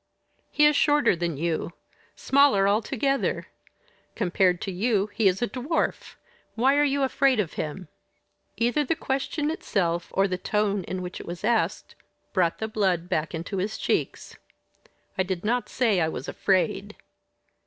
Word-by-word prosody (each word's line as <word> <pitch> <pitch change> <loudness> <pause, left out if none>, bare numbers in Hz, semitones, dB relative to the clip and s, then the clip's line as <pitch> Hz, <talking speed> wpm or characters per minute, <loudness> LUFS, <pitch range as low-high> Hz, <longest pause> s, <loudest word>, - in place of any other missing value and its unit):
"He 300 - +3
is 300 0 +5
shorter 295 -8 +3
than 170 -3 -3
you 165 +2 -2 0.4
smaller 270 -8 +4
altogether. 265 +6 0 0.7
Compared 180 0 +2
to 195 - -3
you 205 +1 0
he 215 -1 +2
is 190 +4 +1
a - - +1
dwarf. 265 +8 -2 0.4
Why 265 +5 +3
are 290 - +4
you 280 -1 +1
afraid 265 -2 +2
of 180 -8 -1
him?" 160 +4 -5 0.7
Either 240 +6 +1
the 310 +4 0
question 290 +2 -2
itself, 175 - -1
or 195 +1 +3
the 185 -1 -3
tone 205 0 0
in 185 -1 -4
which 180 0 -6
it - - -10
was 175 +2 -7
asked, 230 0 0 0.4
brought 175 -4 +1
the 220 - -3
blood 190 -5 0
back 155 +2 -1
into 170 +4 -5
his 200 +4 -2
cheeks. - - -2 0.8
"I - - +5
did 185 0 -3
not 245 +3 0
say 220 -8 +1
I 160 - +2
was 140 -3 -6
afraid." 195 +2 0
205 Hz, 155 wpm, -26 LUFS, 180-255 Hz, 0.8 s, is